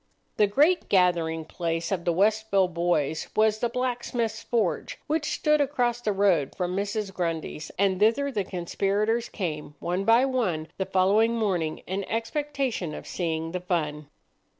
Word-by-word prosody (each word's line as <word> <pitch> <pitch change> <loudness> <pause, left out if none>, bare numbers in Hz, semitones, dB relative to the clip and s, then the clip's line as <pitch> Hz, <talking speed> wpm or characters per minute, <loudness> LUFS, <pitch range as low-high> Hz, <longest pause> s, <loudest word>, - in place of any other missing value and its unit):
The 210 - +5
great 300 - +3
gathering 170 -4 +2
place 165 +1 -3
of 180 -3 -2
the 175 - +3
Westville 200 0 +2
boys 170 -3 0
was 215 0 +3
the 240 - 0
blacksmith's 240 -3 -2
forge, 220 -7 -1
which 305 0 -1
stood 300 0 +2
across 245 -4 0
the 215 - 0
road 190 -8 +2
from 180 0 -2
Mrs. 200 0 -2
Grundy's, 165 -3 -3
and 190 -1 +2
thither 230 +7 +3
the 210 -6 -1
conspirators 200 +5 -1
came 155 -6 -4
one 180 +3 -2
by 230 +4 +5
one 190 -13 -1
the 190 - -1
following 200 +5 +3
morning 180 -8 -1
in 195 +2 -3
expectation 255 - -2
of - - -8
seeing 165 -2 -2
the 180 0 -3
fun. 150 -5 -2
195 Hz, 150 wpm, -26 LUFS, 170-230 Hz, -, The